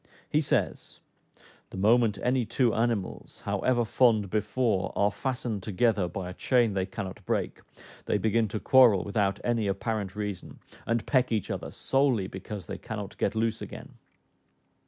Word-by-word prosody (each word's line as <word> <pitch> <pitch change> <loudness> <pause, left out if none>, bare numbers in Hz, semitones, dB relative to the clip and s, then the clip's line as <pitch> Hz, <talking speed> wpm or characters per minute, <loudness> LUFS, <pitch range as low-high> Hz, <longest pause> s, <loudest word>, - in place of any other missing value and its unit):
He 150 - +2
says, 150 - -1 0.7
"The - - -9
moment 110 +2 +3
any 125 0 +2
two 115 +1 +1
animals, 115 -4 -2
however 120 -2 +1
fond 110 -4 +3
before, 110 -2 0
are 100 0 +2
fastened 120 -4 -3
together 105 -1 +1
by 90 +1 -5
a - - -8
chain 120 0 +2
they 95 -1 -1
cannot 100 -1 -6
break, - - -1 0.5
they - - +1
begin 110 +2 +1
to 105 +1 -4
quarrel 120 -8 +6
without 100 -1 0
any 115 -3 0
apparent 100 0 -2
reason, 105 -3 -5 0.3
and 115 0 0
peck 130 -3 +2
each 110 -4 -1
other - - -4
solely 135 -7 +1
because 95 +1 -7
they - - -6
cannot 105 -4 -6
get 100 - 0
loose 110 0 0
again." - - -8
110 Hz, 155 wpm, -28 LUFS, 100-120 Hz, 0.7 s, quarrel